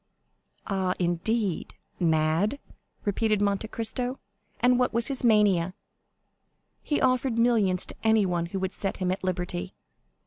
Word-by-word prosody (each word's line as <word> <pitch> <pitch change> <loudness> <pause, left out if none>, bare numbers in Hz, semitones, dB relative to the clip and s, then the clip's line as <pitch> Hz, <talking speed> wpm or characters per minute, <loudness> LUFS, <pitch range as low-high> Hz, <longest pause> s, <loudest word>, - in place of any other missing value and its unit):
"Ah, 190 -2 -1
indeed?—mad!" 175 - 0 0.5
repeated 215 +1 +1
Monte 200 +1 0
Cristo; 245 +4 -3 0.4
"and 250 +1 +4
what 250 - +1
was 235 +3 +3
his 270 -2 -3
mania?" 200 -6 +3 1.1
"He 295 - -1
offered 255 -2 +1
millions 220 -6 +3
to - - -8
anyone 195 -6 +2
who 195 - -5
would 190 +1 -2
set 195 - -2
him 185 -1 -1
at 185 - -4
liberty." 180 0 -3
200 Hz, 125 wpm, -27 LUFS, 180-230 Hz, 1.1 s, and